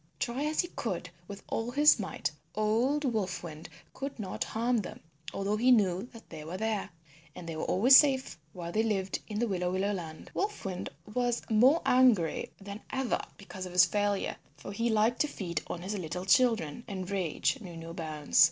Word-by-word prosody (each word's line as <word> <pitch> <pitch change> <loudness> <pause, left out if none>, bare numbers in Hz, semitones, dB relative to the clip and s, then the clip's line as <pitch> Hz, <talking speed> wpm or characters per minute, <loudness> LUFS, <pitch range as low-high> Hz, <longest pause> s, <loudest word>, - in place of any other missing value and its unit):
Try 250 +4 -2
as 310 +1 +2
he 350 - -6
could - - -4 0.2
with 200 -1 -9
all 225 +1 -2
his 290 +1 +5
might 190 -6 -2 0.2
old 235 +8 +1
Wolf 210 -9 -1
Wind 160 -1 -8 0.2
could 275 +1 -5
not 195 -5 -3
harm 235 +2 0
them 205 -5 -5 0.3
although 200 +2 -1
he 245 +4 +3
knew 200 -1 +3
that 230 - -14
they 155 - -7
were 165 +4 -5
there; 220 -1 -1 0.5
and 170 - -9
they 165 - -4
were 155 - -3
always 250 +8 +7
safe 265 - +3
while 170 0 -6
they 215 - +2
lived 195 -4 -1
in 210 - -4
the 240 +2 +1
Willow 180 -3 -1
Willow 195 +2 0
Land. 160 -4 -7
Wolf 415 - -2
Wind 185 -2 -4 0.2
was 245 0 0
more 255 +9 +5
angry 245 -10 +3
than 200 +1 -8
ever 265 -2 0 0.2
because 185 -1 -7
of 180 - -10
his 180 0 +7
failure, 205 +1 0 0.2
for 145 - -8
he 230 +4 0
liked 220 +2 +2
to 300 - +3
feed 175 - -4
on 175 - -5
his 195 +3 -3
little 180 -1 -4
children, 225 -1 +3
and 190 -3 -5
rage 195 - 0
knew 175 -5 -8
no 165 0 -8
bounds. 155 -3 -1
205 Hz, 195 wpm, -30 LUFS, 180-240 Hz, 0.5 s, always